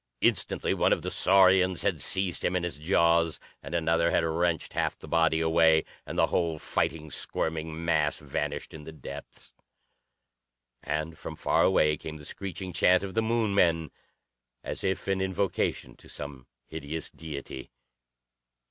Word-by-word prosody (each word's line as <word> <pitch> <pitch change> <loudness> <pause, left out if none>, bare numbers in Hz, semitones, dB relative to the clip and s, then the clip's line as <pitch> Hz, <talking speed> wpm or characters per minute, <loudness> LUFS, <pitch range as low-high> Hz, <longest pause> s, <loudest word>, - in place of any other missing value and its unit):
Instantly - - +1
one - - +2
of - - -2
the - - -3
saurians 95 -1 +4
had 90 -8 0
seized 95 +2 -1
him 90 - +1
in 90 -1 0
its 85 -4 -5
jaws, 85 0 +3 0.2
and 85 - -6
another 85 0 +2
had 85 - +2
wrenched 80 0 0
half - - -1
the - - -12
body 80 -1 +2
away, 80 -1 +4 0.2
and - - -5
the - - +5
whole 85 -3 0
fighting, 80 0 -2
squirming 80 +2 -2
mass 75 -3 +2
vanished 75 0 -4
in 75 - -9
the 80 - -9
depths. 70 -2 -10 1.3
And 75 +2 -3
from - - -7
far - - +1
away 75 -5 +3
came 80 -1 -7
the 75 - -12
screeching 95 0 -6
chant 90 +3 +4
of 95 -1 -5
the 110 - +2
Moon 110 -2 0
men, 85 -5 +2 0.7
as - - -4
if 95 0 -1
in 95 -1 0
invocation 95 +1 -1
to - - -16
some 70 -3 -7 0.2
hideous 80 0 -5
deity. 70 -4 -8
80 Hz, 155 wpm, -28 LUFS, 80-90 Hz, 1.3 s, the